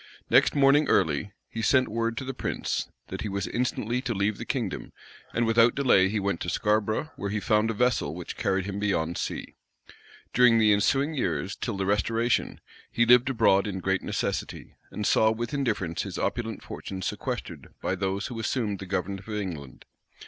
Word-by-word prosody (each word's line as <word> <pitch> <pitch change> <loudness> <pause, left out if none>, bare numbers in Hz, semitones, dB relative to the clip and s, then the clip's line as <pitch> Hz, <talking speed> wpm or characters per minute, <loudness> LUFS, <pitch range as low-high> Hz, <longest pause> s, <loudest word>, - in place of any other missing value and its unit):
Next - - +5
morning 140 +1 +5
early, 90 +2 +2 0.2
he 115 - -5
sent 130 +3 +3
word 115 +1 -2
to - - -3
the 135 - -4
prince, - - -3 0.2
that - - -5
he 105 - -3
was 100 0 -2
instantly 120 0 -1
to 120 -4 -2
leave 100 +2 0
the - - -5
kingdom; - - -3 0.4
and 120 - +1
without 115 +1 +4
delay, 120 -9 +4
he 105 +1 -1
went 100 -3 -1
to 90 - -3
Scarborough, 110 - 0
where 100 - -3
he 105 +2 -1
found 105 +1 +2
a 115 - -2
vessel, 120 -10 +1
which 90 -1 -6
carried 95 -1 0
him 100 0 -4
beyond 85 -5 0
sea. - - -4 0.8
During 125 -2 +6
the 110 -2 +5
ensuing 135 +9 +2
years, 100 -8 -2
till 115 -5 -4
the 95 - -1
restoration, 115 +4 0 0.3
he 120 - +3
lived 125 +2 +6
abroad 110 -6 +3
in 95 -2 -3
great 95 +1 0
necessity, - - -3 0.2
and 105 - -4
saw 110 - +4
with 120 +4 -3
indifference 110 - -1
his - - -5
opulent 115 -3 -2
fortune 95 -1 -7
sequestered - - -4
by - - -1
those 95 +1 -2
who 120 -2 -5
assumed 110 -3 -1
the 95 - -7
government 95 +1 -2
of 95 - -14
England. 90 -11 -5
105 Hz, 185 wpm, -27 LUFS, 95-120 Hz, 0.8 s, During